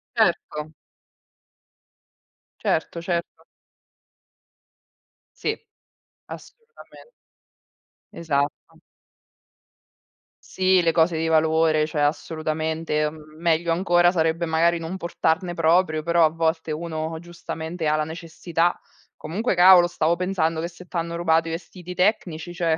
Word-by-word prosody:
Certo. 150 +1 0 1.9
Certo, 165 +1 -1
certo. 170 0 -4 1.9
Sì, - - -1 0.8
assolutamen 465 +1 -14 1.0
Esatto. 145 -3 -3 1.7
Sì, 185 -1 +2
le 165 - +3
cose 165 0 +2
di 165 - -1
valore, 160 -1 +3
cioè 150 -1 -2
assolutamente. 155 0 -1
Meglio 160 +2 -2
ancora 175 0 +3
sarebbe 165 -1 0
magari 165 +1 +2
non 165 +2 -5
portarne 175 0 -1
proprio, 165 -1 +2
però 170 +1 +3
a 160 - +5
volte 160 0 -1
uno 160 0 -4
giustamente 170 -1 -6
ha 150 - +2
la 155 - 0
necessità. 165 +1 -2 0.4
Comunque 195 +8 -2
cavolo, 180 0 +7
stavo 165 -1 0
pensando 170 -3 -1
che 170 - -2
se 175 +1 -13
t'hanno 170 -2 -4
rubato 165 -1 +2
i - - -3
vestiti 180 +1 -8
tecnici, 175 -3 0
cioè, 165 -2 0
165 Hz, 105 wpm, -23 LUFS, 160-175 Hz, 1.9 s, cavolo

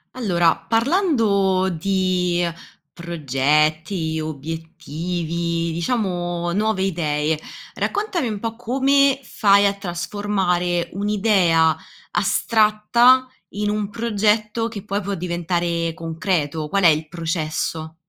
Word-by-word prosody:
Allora, 175 -9 +2
parlando 225 - +1
di 180 0 0 0.5
progetti, 155 +1 0
obiettivi, 165 +2 -4
diciamo 175 -2 -2
nuove 210 +1 0
idee, 155 -4 0 0.4
raccontami 405 - -1
un 210 -2 -3
po' 225 0 -4
come 270 +3 +2
fai 200 -3 +3
a 200 - +1
trasformare 180 -2 -1
un'idea 195 -5 +2 0.4
astratta, 220 +6 +3 0.3
in 205 +1 -1
un 210 -1 -1
progetto 215 0 0
che 210 -4 -7
poi 200 -1 -2
può 200 0 -3
diventare 170 -1 -2
concreto, 160 -2 -2
qual 200 +5 0
è - - +8
il 155 0 +2
processo? 160 -1 -3
180 Hz, 95 wpm, -21 LUFS, 165-210 Hz, 0.5 s, è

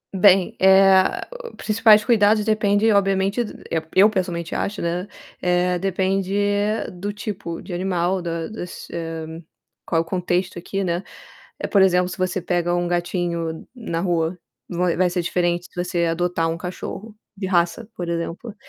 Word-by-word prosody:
Bem, 190 -1 +5
eh, 190 0 +5 0.4
principais 215 -1 +5
cuidados 210 -2 +4
depende 210 0 +2
obviamente 195 +2 +2 0.3
eu 165 - 0
eu 200 +3 +6
pessoalmente 175 -5 -3
acho, 200 +1 -2
né, 170 +2 -2 0.4
eh, 180 0 +2
depende 190 0 0 0.6
do 190 +3 -4
tipo 205 -5 -6
de 180 - -8
animal, 180 0 0
da 165 -1 -3
das, 195 -5 -8
hã, 165 0 -6 0.4
qual 165 - +1
o - - -6
contexto 180 +1 -1
aqui, 195 +3 -3
né. 175 0 -1 0.6
Eh, - - -3
por 200 - +3
exemplo, 180 -1 +4
se - - -7
você 185 0 -1
pega 175 -1 0
um 175 0 0
gatinho 175 -2 -2
na 225 -9 -4
rua, 170 -1 0 0.3
vai 180 -1 0
vai 180 +1 +2
ser 175 0 -1
diferente 175 0 0
se 175 - -2
você 175 -2 0
adotar 165 0 0
um 165 - -4
cachorro 190 +4 -7 0.2
de 195 -1 -4
raça, 180 +4 0
por 175 - -4
exemplo. 170 +6 -4
180 Hz, 155 wpm, -22 LUFS, 175-195 Hz, 0.6 s, eu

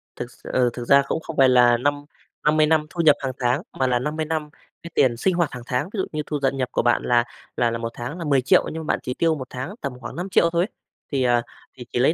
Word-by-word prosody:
Thực 120 0 -6
s - - -21
ừ, 125 -1 +3
thực 120 -1 -6
ra 140 0 +7
cũng - - -1
không 160 -1 -8
phải 135 -1 +6
là 120 -1 +5
năm 145 +3 -1 0.4
năm 155 +1 +3
mươi 155 - +5
năm 155 -1 +2
thu 170 - -2
nhập 150 -3 +6
hàng 135 -1 -2
tháng, 125 +4 +1 0.2
mà 130 - +2
là 125 -1 +2
50 155 +4 -2
năm 155 -1 -3 0.3
cái 170 - -9
tiền 120 -4 +3
sinh 185 +8 +1
hoạt 170 -3 +1
hàng 125 -1 -8
tháng, 125 +9 -1
ví - - -5
dụ 190 - 0
như 155 -1 -2
thu 150 -2 -3
dận 135 0 0
nhập 130 -1 -1
của - - +1
bạn 120 0 +2
là 120 -1 +3 0.3
là 120 -1 +2
là 115 - -2
một 115 0 -3
tháng 125 +8 -6
là 165 - -5
10.000.000 135 -3 +3
nhưng 160 -1 -5
mà - - +2
bạn - - -2
chỉ 125 - -3
tiêu 165 +1 +1
một 130 -3 -7
tháng 130 +11 -6
tầm 140 -2 -3
khoảng 120 - -8
5.000.000 175 -1 +2
thôi 170 +1 +1
ấy. - - -12 0.4
Thì, 135 -2 +1
ờ, 120 -1 +3 0.4
thì 125 - -9
chỉ 120 - 0
lấy 135 +6 +4
135 Hz, 290 wpm, -23 LUFS, 125-155 Hz, 0.4 s, ra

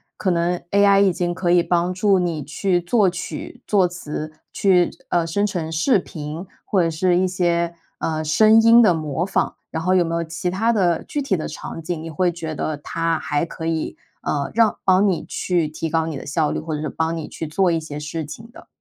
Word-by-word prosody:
可 190 - 0
能 175 +1 +1
AI 200 0 +5
已 195 -2 +4
经 175 0 -1
可 175 0 0
以 175 0 +5
帮 175 +1 0
助 195 +1 +3
你 170 -4 -1
去 175 +5 0
作 190 +3 +2
曲、 185 +7 -7
作 195 -3 +4
词， 155 -3 -5 0.2
去 180 -3 +3 0.2
呃， 170 -2 +1
生 200 +5 0
成 175 -6 -3
视 175 - +2
频， 155 0 -7 0.2
或 195 - +1
者 165 - +2
是 175 +2 +1
一 185 +1 +2
些 170 -2 0 0.2
呃， 155 -1 -2
声 215 +8 +5
音 230 +1 +7
的 210 -6 +5
模 155 0 -2
仿。 195 - -1
然 160 - -4
后 185 +1 +2
有 180 -2 +4
没 165 0 -2
有 170 - 0
其 165 +2 -3
他 220 +6 +1
的 180 -7 +1
具 290 - -3
体 250 -9 0
的 155 - -3
场 165 - -7
景， 165 0 -3
你 165 - -6
会 175 +3 +1
觉 160 -2 -5
得 155 0 -2
它 165 +2 -1
还 145 +3 -1
可 165 -1 -7
以， 165 -1 -2 0.2
呃， 140 -1 -1
让 230 -2 +3
帮 190 +1 +5
你 190 -4 0
去 175 -4 -1
提 155 +2 -4
高 160 0 +1
你 160 - -4
的 - - -7
效 150 +1 0
率， - - -2
或 160 0 -5
者 150 - -3
是 155 - -2
帮 160 +3 -1
你 160 - -5
去 160 - -6
做 180 +5 +1
一 165 - +2
些 150 -2 -7
事 155 +2 -4
情 220 +10 -10
的？ - - -14
170 Hz, 245 characters per minute, -21 LUFS, 160-185 Hz, 0.2 s, 音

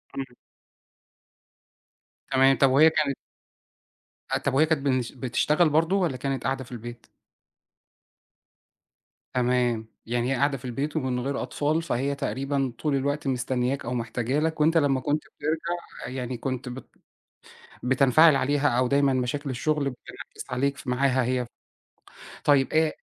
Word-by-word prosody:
إمم. 135 -3 -6 1.9
تمام. 135 0 +4
طَب 135 - +5
وهي 145 +5 +6
كانت 150 -4 0 1.1
أ - - +1
طَب 135 - -2
وهي 145 +4 +5
كانت 160 -2 0
بنش 130 -3 0
بتشتغل 150 +6 +1
برضه، 160 +5 +2
والّا 175 -9 0
كانت 135 0 -3
قاعدة 130 +2 -1
في 125 - -16
البيت؟ 120 0 -8 2.3
تمام. 125 -3 +1 0.2
يعني 120 +2 -1
هي - - +2
قاعدة 140 +2 +1
في 130 - -12
البيت 140 +5 -3
ومن 130 -5 -1
غير 135 +3 -2
أطفال، 155 +3 -1
فهي 140 -3 -1
تقريبًا 135 -1 -2
طُول 150 -2 0
الوقت 145 +2 -1
مستنياك 125 +1 -1
أو 120 - -3
محتاجة 120 +3 -1
لك، 160 0 -1
وأنت 165 +2 +4
لمّا 140 -4 +3
كنت 145 +3 -1 0.2
بترجَع 165 +3 -4
يعني 125 -1 -4
كنت 130 +1 -4
بت 125 +2 -8 1.0
بتنفعل 135 +4 +5
عليها 145 +2 +1
أو 125 +1 +1
دايمًا 140 0 +3
مشاكل 130 +3 -2
الشغل 150 +4 0
بتنعكس 125 - -10
عليك 140 +3 0
ف - - -12
معاها 130 +1 +2
هي. 125 0 0 1.0
طيب 140 -2 +3
آآ 160 0 +3
135 Hz, 140 wpm, -26 LUFS, 125-145 Hz, 2.3 s, وهي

